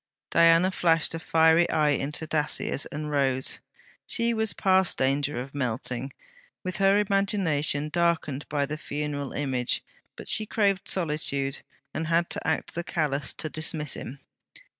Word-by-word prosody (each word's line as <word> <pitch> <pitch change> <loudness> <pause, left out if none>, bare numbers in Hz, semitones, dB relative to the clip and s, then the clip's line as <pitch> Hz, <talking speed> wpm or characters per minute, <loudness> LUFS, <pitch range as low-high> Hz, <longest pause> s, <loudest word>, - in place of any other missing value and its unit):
Diana 165 +2 +5
flashed 165 -4 +2
a 165 - -3
fiery 160 +1 +4
eye 150 -1 +3
into 145 +3 -2
Dacier's, 150 -2 -1
and 150 0 -5
rose. 135 -2 +1 0.5
She 235 0 +1
was 220 -1 +1
past 190 -1 +3
danger 135 +1 +1
of 130 +2 -5
melting, 125 0 -3 0.5
with 185 -1 -3
her 195 0 +4
imagination 190 -8 +1
darkened 165 -4 0
by 145 -1 0
the 150 +2 -5
funeral 145 -2 -4
image; 130 -4 -1 0.3
but - - -9
she 215 -1 +2
craved 200 -3 +1
solitude, 150 -5 -1 0.3
and 160 +1 -3
had 170 +1 +1
to - - -3
act 160 - -1
the 170 - -3
callous, 150 -5 -1
to 155 - -4
dismiss 155 -1 -2
him. 130 - -6
155 Hz, 145 wpm, -27 LUFS, 140-170 Hz, 0.5 s, Diana